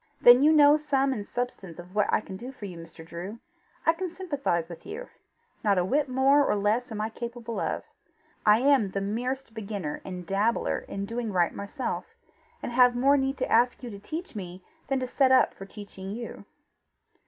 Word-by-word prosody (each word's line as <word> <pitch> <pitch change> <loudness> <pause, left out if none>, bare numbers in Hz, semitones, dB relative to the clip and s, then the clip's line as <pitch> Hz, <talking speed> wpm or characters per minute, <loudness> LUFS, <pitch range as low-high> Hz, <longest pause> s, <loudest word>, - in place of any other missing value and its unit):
"Then 245 +1 +8
you 300 +2 +6
know 295 -1 +7
sum 275 -3 +1
and 205 -4 -5
substance 200 -9 -4
of 175 +1 -11
what 210 -1 +2
I - - +3
can 190 - -9
do 245 +7 -7
for 235 -6 -9
you, 185 -3 -7
Mr. 165 -1 -11
Drew: 175 +6 -7 0.5
I 325 - +5
can 365 +2 -4
sympathize 285 - -2
with 170 -1 -10
you; 450 +5 -7 0.5
not 200 -3 +3
a 180 - +2
whit 280 +7 +1
more 270 +3 +4
or 270 - +1
less 215 +4 0
am 215 - -4
I 215 +1 -1
capable 235 0 -5
of. - - -2 0.6
I 215 +2 +5
am 265 -7 +4
the 195 - -2
merest 240 +5 -3
beginner 200 -8 -5
and 180 -2 -7
dabbler 205 +6 +1
in 200 0 -4
doing 230 +1 -3
right 175 -3 +2
myself, 260 - -5 0.5
and - - -3
have 245 0 +5
more 275 +3 +4
need 270 0 0
to - - -2
ask 245 +3 +3
you 240 - -6
to 200 - -8
teach 320 - -6
me 185 -2 -7 0.2
than 270 0 0
to - - 0
set 260 +1 +2
up 260 - +5
for 195 - -10
teaching 195 -2 -9
you." 235 0 -7
235 Hz, 200 wpm, -27 LUFS, 195-270 Hz, 0.6 s, Then